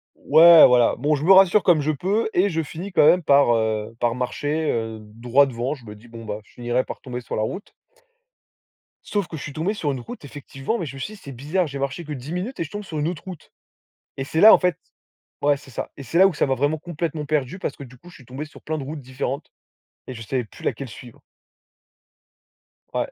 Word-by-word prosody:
Ouais, 165 +2 +8
voilà, 125 -2 +4
bon 150 +5 +1
je 145 - -4
me 180 - +4
rassure 195 +1 +6
comme 170 -4 +4
je 150 +2 0
peux 195 +10 -1
et 190 +3 +3
je 165 -3 -1
finis 170 +5 -7
quand 170 - +4
même 180 +3 +5
par, 140 -5 +4
heu, 110 0 -2
par 120 -1 +1
marcher, 145 +5 -2
heu, 110 -1 -2
droit 115 +6 +2
devant. 125 +1 -3
Je 130 -6 -12
me 105 -1 -9
dis: 110 +3 -17
«Bon 115 0 -10
bah, 105 -1 -4
je - - -24
finirai 120 +1 -1
par - - -8
tomber 125 -1 -6
sur 120 - -6
la - - -1
route». 190 - -6 1.3
Sauf 205 -4 -2
que - - -8
je 150 - -7
suis 145 - -7
tombé 165 +7 -1
sur 155 -9 -2
une 135 - -4
route 145 - -10
effectivement 140 - -5
mais 175 - -4
je 140 -2 -8
me - - -9
suis 210 +11 -5
dit: - - -16
«C'est 140 - -8
bizarre, 150 +9 -1
j'ai 140 -1 -6
marché 140 +4 -3
que 150 - -8
10 135 +2 -8
minutes 185 +9 -4
et - - 0
je 155 - -9
tombe 205 +3 -6
sur 160 -6 -5
une 150 - 0
autre 170 -3 -5
route» 185 -4 -10 0.7
et 135 - -3
c'est 160 +3 -1
là 220 +3 +10
en - - +5
fait 180 -3 0 0.6
ouais 145 0 +3
c'est 140 -1 -15
ça. 120 - -5
Et 140 - -8
c'est 150 +8 -1
là 190 - +8
où 190 - -4
ça - - +1
m'a 135 - +1
vraiment 145 +4 0
complètement 165 -2 -4
perdu 150 +2 -1
parce 145 - -4
que 140 - -9
du 125 -1 -15
coup 175 - -16
je - - -15
suis 130 - -16
tombé 130 +5 -6
sur 155 - -16
plein 155 0 -3
de 140 - -5
routes 150 +2 -6
différentes 130 +2 -5 0.6
et 130 - -6
je 115 - -8
savais 125 +3 -2
plus 110 - -15
laquelle 140 - -3
suivre. 120 +1 -13 1.7
Ouais. - - -2
145 Hz, 250 wpm, -23 LUFS, 125-170 Hz, 1.7 s, là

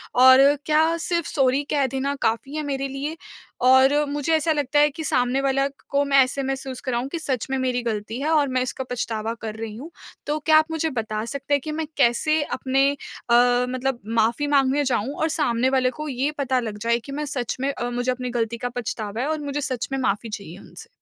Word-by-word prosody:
और 260 +3 +7
क्या 315 +2 +3
सिर्फ़ 340 0 -1
सॉरी 270 0 +2
कह 285 -2 +2
देना 270 +2 -2
काफ़ी। 270 +7 -1
मेरे 275 -1 -2
लिए 285 +4 -5 0.4
और 260 +2 +6 0.2
मुझे 290 +2 -1
ऐसा 315 +1 +1
लगता 290 0 +1
है 295 0 +5
कि 315 +3 -7
सामने 250 -1 +1
वाला 275 0 +1 0.2
को 280 0 +2
मैं 275 -1 +3
ऐसे 270 +2 -3
महसूस 265 -1 -4
कराऊँ 255 -1 -2
कि 335 - -4
सच 260 -7 -2
में 265 - +1
मेरी 250 -1 0
ग़लती 220 0 -3
है, 305 - -1
और 300 -3 +3
मैं 255 0 0
इसका 255 +1 -4
पछतावा 225 -2 -2
कर 220 -1 -5
रही 220 -1 -6
हूँ। 290 +9 -9 0.4
तो 295 +1 0
क्या 310 +1 +4
आप 310 - +4
मुझे 320 0 -1
बता 220 -5 -3
सकते 280 +3 -3
हैं 285 - +3
कि 305 - -5
मैं 315 0 -3
कैसे 285 +4 +3
अपने 270 0 +1
अ, 245 -4 -3 0.4
मतलब 265 -1 -1 0.2
माफ़ी 235 +7 +1
माँगने 280 0 +3
जाऊँ 250 +1 0
और 320 - +2
सामने 255 -5 +1
वाले 260 -1 +2
को 305 - -4
ये 270 +3 -1
पता 260 -2 +1
लग 220 -3 -5
जाए 235 +1 +2
कि 275 - -8
मैं 300 +1 -3
सच 255 -5 -3
में 275 +1 +1
अ, 240 -2 -3
मुझे 245 +1 0
अपनी 250 0 -5
ग़लती 235 -1 -2
का 245 - -3
पछतावा 225 -2 -4
है 275 - -1
और 315 - -1
मुझे 290 0 -3
सच 255 -4 -2
में 270 - 0
माफ़ी 220 -1 -1
चाहिए 200 -4 -7
उनसे। - - -12
265 Hz, 220 wpm, -23 LUFS, 245-290 Hz, 0.4 s, और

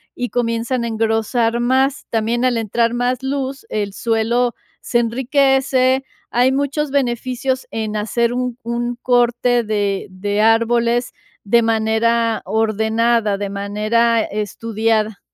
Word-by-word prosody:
y 245 -1 -3
comienzan 235 +1 -1
a - - -2
engrosar 225 +1 0
más. 260 +3 +1
También, 230 +2 0
al 250 -1 +2
entrar 230 +1 0
más 245 +1 -1
luz, 270 0 -3
el 205 -2 -2
suelo 230 +3 0 0.2
se 240 - 0
enriquece, 265 +2 +2 0.3
hay 250 +2 +3
muchos 285 +2 -1
beneficios 255 0 -1
en 220 -1 -3
hacer 235 +3 0
un 250 -1 -2
un 240 +1 -2
corte 245 0 +2
de 205 -2 -1
de 205 +3 -2
árboles 235 +2 +2 0.3
de 235 +4 +4
manera 225 0 +1
ordenada, 220 +1 +1
de 200 0 -4
manera 215 +4 +1
estudiada. 215 +1 -1
235 Hz, 120 wpm, -19 LUFS, 220-245 Hz, 0.3 s, de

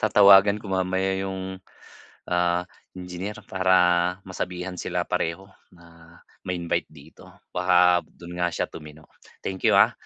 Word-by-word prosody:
Tatawagan 100 -1 +6
ko 105 -2 -7
mamaya 95 +1 0
yung, 95 -1 -5 0.7
ah, 90 0 +1 0.3
engineer 90 +3 -6
para 95 0 +1 0.5
masabihan 90 -1 -5
sila - - -2
pareho 85 +4 -2 0.3
na 85 -1 -18 0.3
ma-invite 90 -2 -2
dito, 75 0 -16 0.2
baka 90 -1 +4
dun 85 0 -11
nga 85 - +2
siya - - -1
tumino. 75 0 -12 0.4
Thank 95 -1 -1
you - - +4
ah, - - +6
90 Hz, 125 wpm, -24 LUFS, 85-95 Hz, 0.7 s, Tatawagan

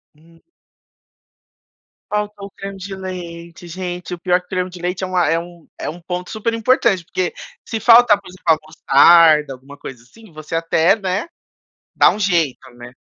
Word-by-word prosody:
Hum. 165 +2 -23 1.7
Falta 210 0 -2
o 200 - -7
creme 195 0 -9
de 195 +1 -7
leite, 175 -2 -8
gente. 180 0 -6
O - - -18
pior 180 +1 +1
que 180 - -30
o - - -43
creme 185 -1 -2
de 180 -1 -11
leite 180 +1 -3
é - - +1 0.3
um 170 -1 -12
é - - -5
um 170 +3 -9
ponto 180 +1 -5
super 225 +1 -2
importante 225 -6 +1
porque 180 -1 -2 0.3
se 225 - -4
faltar, 230 -2 +6
por - - -17
exemplo, 180 0 -15
a 160 -1 +5
mostarda, 155 -1 +5
alguma 135 +2 -14
coisa 125 -4 -10
assim, 205 - -19
você 155 +1 -7
até, 165 +2 +2
né, 195 - -2 0.7
dá - - +5
um - - -2
jeito, 165 -10 0
né. 120 +1 -12
180 Hz, 175 wpm, -18 LUFS, 165-195 Hz, 1.7 s, faltar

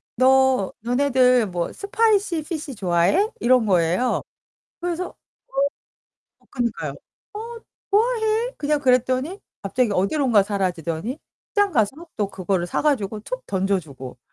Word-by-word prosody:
"너 260 -3 +4
너네들 250 -1 +3
뭐 175 -2 -2
spicy 405 -4 +1
fish 300 -4 -5
좋아해?" 190 - +2
이런 250 -1 +4
거예요. 180 +5 +2 0.6
그래서 355 +1 -3 1.3
"응" - - -29
어 - - -31
그니까요. 190 - -2 0.4
"어. 460 +2 -6 0.3
좋아해." 445 +2 +2
그냥 295 0 0
그랬더니 255 - +1 0.2
갑자기 225 +3 +1
어디론가 215 +2 +3
사라지더니 190 - -2 0.3
시장 410 -2 +2
가서 270 +9 0
또 205 -2 0
그거를 185 -1 -1
사 - - -1
가지고 215 -8 0
툭 - - -6
던져주고. 165 -11 -3
255 Hz, 295 characters per minute, -23 LUFS, -, 1.3 s, 너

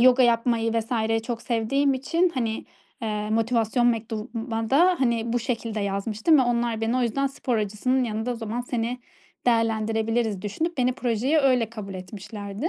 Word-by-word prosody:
yoga 255 +1 +6
yapmayı 230 -1 +2
vs. 225 0 0
çok 230 0 -4
sevdiğim 265 +4 +1
için 335 +7 +1
hani, 225 -3 -2 0.4
eee, 210 -1 -2
motivasyon 230 +1 +2
mektubuma 225 0 -2
da 350 +6 +5
hani 235 -3 +1
bu 245 - +2
şekilde 230 -3 -3
yazmıştım 210 +9 +2
ve - - +5
onlar 235 -2 0
beni 225 +3 0
o 255 - +2
yüzden 260 +4 +1
"Spor 265 -3 -2
hocasının 215 +5 0
yanında 220 +1 -2
o - - -1
zaman 230 +1 -4
seni 245 0 -2 0.5
değerlendirebiliriz." 225 -2 +1
düşünüp 315 - -3
beni 250 0 +3
projeye 250 +5 +1
öyle 250 -5 +2
kabul 200 -4 -7
etmişlerdi. 200 - -5
230 Hz, 155 wpm, -25 LUFS, 220-250 Hz, 0.5 s, yoga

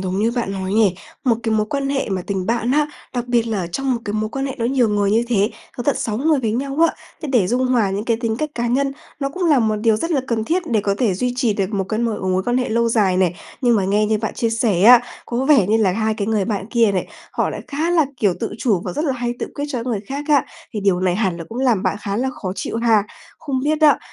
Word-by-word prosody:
đúng 185 0 -2
như 225 +2 +2
bạn 235 -5 -2
nói 190 0 -3
nhỉ? 210 -5 +4 0.3
Một 235 -3 +3
cái 225 -1 0
mối 215 -1 +1
quan 275 +4 -2
hệ 275 -1 -1
mà 190 -2 -2
tình 190 -2 -2
bạn 235 +1 0
á, 300 +1 +3 0.3
đặc 245 -1 -2
biệt 240 -1 +2
là 220 -2 -1
ở 175 - -3
trong 265 +9 -1
một 235 - -4
cái 205 - -3
mối 215 0 -1
quan 270 +2 -2
hệ 265 - -5
nó 230 - -1
nhiều 245 -1 +2
người 205 -1 +1
như 225 +3 +3
thế, 210 -2 +2 0.3
có 245 - -3
tận 285 +2 +1
6 215 0 -2
người 300 -1 +2
với 220 -3 -1
nhau 275 +3 -2
á, - - -5 0.3
thế 305 - -4
để 220 -8 +4
dung 250 +4 +1
hòa 235 -6 +2
những 200 +2 -2
cái 230 -1 +1
tính 225 -2 -1
cách 305 +4 -2
cá 240 0 -1
nhân, 270 +3 +1 0.3
nó 275 - 0
cũng 360 +6 -4
là 305 -5 +4
một 220 -2 +1
điều 220 0 +2
rất 330 +10 -3
là 295 -5 +2
cần 225 -3 -1
thiết 350 +8 0
để 220 -3 +3
có 200 -1 0
thể 220 -7 +2
duy 250 +6 -1
trì 240 -4 +2
được 195 -1 -2
một 195 -2 0
cái 215 - -1
m - - +1 0.3
mối 185 +1 +1
quan 245 +5 0
hệ 250 - -1
lâu 235 +1 +1
dài 205 -5 +2
này. 180 -2 +2 0.3
Nhưng 240 -3 +3
mà 195 - +1
nghe 210 +2 +2
như 215 0 +1
bạn 220 - -3
chia 230 - 0
sẻ 225 -5 +1
á, 240 +3 +9 0.3
có 245 +2 -1
vẻ 275 -9 +5
như 215 +3 +3
là 205 -5 +2
hai 220 +2 0
cái 205 -2 -3
người 215 -3 +1
bạn 200 -3 -3
kia 230 -4 +3
này, 185 - -1 0.3
họ - - 0
lại - - -5
khá 315 +4 -1
là, 320 -5 +3
kiểu, 200 -6 +2
tự 225 - -2
chủ 210 -8 +1
và 180 - -3
rất 300 - -2
là 275 - +1
hay 240 -1 -3
tự - - -3
quyết 285 - -3
cho 260 - -3
những 230 - -5
cái 250 - -2
người 210 - -1
khác 280 +2 -4
á, 290 -3 +4 0.3
thì 210 - -3
điều 195 -3 +2
này 185 -1 +1
hẳn 190 -5 0
là 170 - -7
cũng 230 - -6
làm 245 -7 +2
bạn - - 0
khá 200 -1 -3
là 260 +3 0
khó 185 -7 -5
chịu 220 - -4
ha? 230 -3 +3 0.4
Không 270 -4 -2
biết 310 +1 +1
á 300 -2 +6
230 Hz, 305 wpm, -20 LUFS, 205-255 Hz, 0.4 s, á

